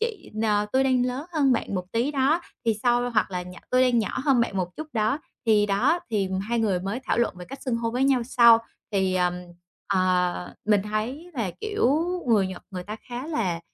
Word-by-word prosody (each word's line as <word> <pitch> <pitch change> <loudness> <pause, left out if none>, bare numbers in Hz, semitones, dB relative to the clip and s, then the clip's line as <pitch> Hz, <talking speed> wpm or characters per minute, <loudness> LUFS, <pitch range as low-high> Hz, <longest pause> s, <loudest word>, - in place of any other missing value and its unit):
chị 455 -2 -4
n 220 - 0 0.3
tôi 265 +1 +3
đang 255 -1 +2
lớn 260 +6 -4
hơn 280 -5 +3
bạn 230 - -1
một 180 -1 -2
tí 240 +5 +1
đó, 285 +4 +2 0.2
thì 225 -2 +2
sau 245 0 +2
hoặc 215 -3 +1
là 180 -1 -3
nhỏ 180 0 -10
tôi 255 0 +4
đang 250 -2 +3
nhỏ 220 - -1
hơn 270 -5 +4
bạn 210 -4 -1
một 180 -1 -3
chút 310 - -5
đó", 220 +5 +1 0.3
thì 210 -2 +4
đó, 245 - +2
thì 200 -3 0 0.2
2 235 0 0
người 200 -5 +1
mới 200 +7 -3
thảo - - 0
luận 235 - +1
về 180 - -7
cách 275 +7 -10
xưng 250 -4 -1
hô 230 0 -2
với 255 +3 +1
nhau 265 -3 +3
sau. 235 -2 +6 0.3
Thì, 190 -2 +1
ờm, 180 -1 +1 0.5
à, 180 - 0
mình 210 -2 +3
thấy 230 - -4
là, 225 -7 -1
kiểu, 415 - +1 0.3
người 205 -4 +4
Nhật 185 - -7
người 180 -2 -5
ta 210 +4 -6
khá 245 +4 -5
là 190 - -1
230 Hz, 225 wpm, -25 LUFS, 195-260 Hz, 0.5 s, sau